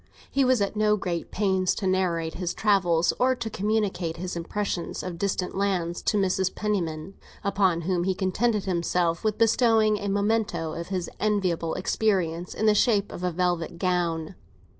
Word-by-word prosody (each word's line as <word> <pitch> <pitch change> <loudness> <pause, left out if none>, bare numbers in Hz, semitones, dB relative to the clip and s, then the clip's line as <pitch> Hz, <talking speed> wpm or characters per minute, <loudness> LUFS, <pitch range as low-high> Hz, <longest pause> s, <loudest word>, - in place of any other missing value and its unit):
He 275 - +2
was 255 -3 +3
at 200 +1 -1
no 210 0 +3
great 175 -4 -3
pains 190 -3 +1
to 200 - -4
narrate 175 -4 0
his 180 0 -3
travels 180 -6 +2
or 260 +1 +3
to 235 -3 -4
communicate 200 -5 -1
his 180 +1 -4
impressions 175 +1 -3
of 175 -2 -6
distant 190 -2 -1
lands 185 -4 -1
to 210 - +1
Mrs. 190 -1 +1
Penniman, 180 -5 -2 0.3
upon 190 -4 +2
whom 175 0 0
he 190 -1 +1
contented 205 +3 0
himself 170 -2 0
with 215 -1 0
bestowing 225 -2 +3
a 200 - -4
memento 200 -5 0
of 170 0 -5
his 185 -2 -2
enviable 185 -6 0
experience, 180 -4 0
in 220 - -1
the 215 - +6
shape 210 -2 +2
of 180 - -7
a 180 - +1
velvet 175 -1 -1
gown. 170 -2 -1
190 Hz, 165 wpm, -26 LUFS, 170-210 Hz, 0.3 s, the